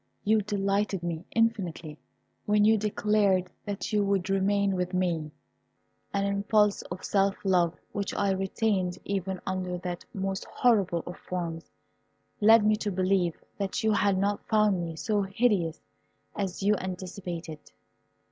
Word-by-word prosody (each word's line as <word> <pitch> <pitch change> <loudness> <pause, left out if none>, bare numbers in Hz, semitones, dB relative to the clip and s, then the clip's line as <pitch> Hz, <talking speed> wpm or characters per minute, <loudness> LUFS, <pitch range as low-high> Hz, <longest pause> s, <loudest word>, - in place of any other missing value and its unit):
You 215 +1 +3
delighted 200 -2 -1
me 170 0 -3
infinitely 180 -9 0 0.5
when 210 0 +4
you 220 +1 +6
declared 205 -3 +1
that 205 +1 -4
you 210 -1 +3
would 195 -1 0
remain 200 0 +2
with 180 0 -2
me. 170 -4 0 0.8
An 200 0 0
impulse 205 +1 +2
of 185 - -6
self 195 0 +2
love, 175 -3 +2
which 200 -1 -3
I 200 -1 +1
retained 190 -1 0
even 190 -1 -2
under 185 -1 -2
that 175 -1 -5
most 195 0 -3
horrible 200 -8 +2
of 175 - -7
forms, 170 -2 -5 0.7
led 220 0 +6
me 215 0 +4
to 210 -1 -2
believe 185 -2 0 0.2
that 200 +4 -2
you 220 - +3
had 200 -2 +2
not 200 +1 0
found 210 -4 +3
me 165 -1 -5
so 210 +5 0
hideous 195 -4 +1 0.6
as 195 -1 -3
you 210 +1 +4
anticipated. 180 -3 -6
195 Hz, 140 wpm, -28 LUFS, 180-205 Hz, 0.8 s, you